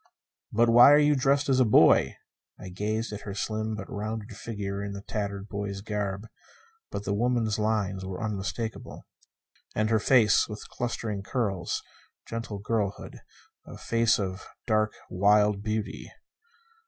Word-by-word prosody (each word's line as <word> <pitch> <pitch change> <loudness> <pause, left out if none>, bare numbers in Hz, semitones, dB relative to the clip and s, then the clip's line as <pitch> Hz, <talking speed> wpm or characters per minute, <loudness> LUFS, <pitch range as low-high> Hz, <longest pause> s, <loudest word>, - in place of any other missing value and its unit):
"But 115 +2 +3
why 120 +4 +8
are - - +7
you 150 0 +4
dressed 140 +1 +2
as 130 -2 +3
a - - +6
boy?" 110 - +5 0.4
I 95 - -8
gazed 105 +4 -3
at 105 - -6
her 100 -1 -7
slim 110 +1 -2
but 100 -2 -7
rounded 110 +2 -5
figure 100 -3 -5
in 100 0 -5
tattered 100 -1 -3
boy's 100 -1 -4
garb 105 -1 -3 0.6
but 100 - -5
the 100 - 0
woman's 115 -1 0
lines 105 -3 0
were 95 -1 -5
unmistakable. 105 0 -4 0.7
And 110 +1 +1
her 110 - +4
face, 110 -3 +4
with 105 0 -8
clustering 110 -4 -3
curls. 100 -5 -2 0.4
Gentle 115 -2 -5
girlhood. 100 -1 -3 0.5
A - - -9
face 115 0 +2
of 95 -1 -4 0.2
dark, 110 -1 +1 0.2
wild 105 +2 +3
beauty. 110 0 -4
105 Hz, 140 wpm, -27 LUFS, 100-115 Hz, 0.7 s, why